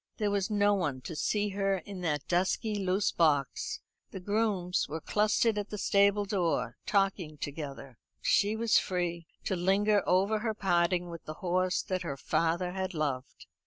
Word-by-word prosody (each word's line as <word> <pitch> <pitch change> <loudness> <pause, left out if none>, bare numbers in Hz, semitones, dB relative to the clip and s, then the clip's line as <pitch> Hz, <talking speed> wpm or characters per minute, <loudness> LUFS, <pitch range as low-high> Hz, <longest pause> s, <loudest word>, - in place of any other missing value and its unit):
There 210 -2 0
was 200 0 0
no 205 -1 +3
one 150 -10 -1
to 160 - -7
see 210 +6 0
her 195 0 0
in 185 +1 -8
that 150 -4 -1
dusky 190 +5 +1
loose 195 0 +1
box. 145 -5 +1 0.3
The - - -7
grooms 200 -2 0
were 160 +2 -3
clustered 210 +4 +2
at 205 - -5
the 210 - -5
stable 200 0 +3
door, 170 - -1
talking 195 -6 0
together. 140 -4 -7 0.2
She 205 +2 +2
was 225 -1 +4
free 175 -2 -2 0.2
to 190 - -1
linger 200 +3 +3
over 200 +4 +3
her 220 0 -2
parting 175 -3 +1
with 170 - -9
the 155 - -6
horse 185 +1 +1
that 185 -1 -2
her 140 -6 -4
father 170 +5 0
had 185 -1 -3
loved. 140 -4 -3
185 Hz, 165 wpm, -30 LUFS, 170-205 Hz, 0.3 s, was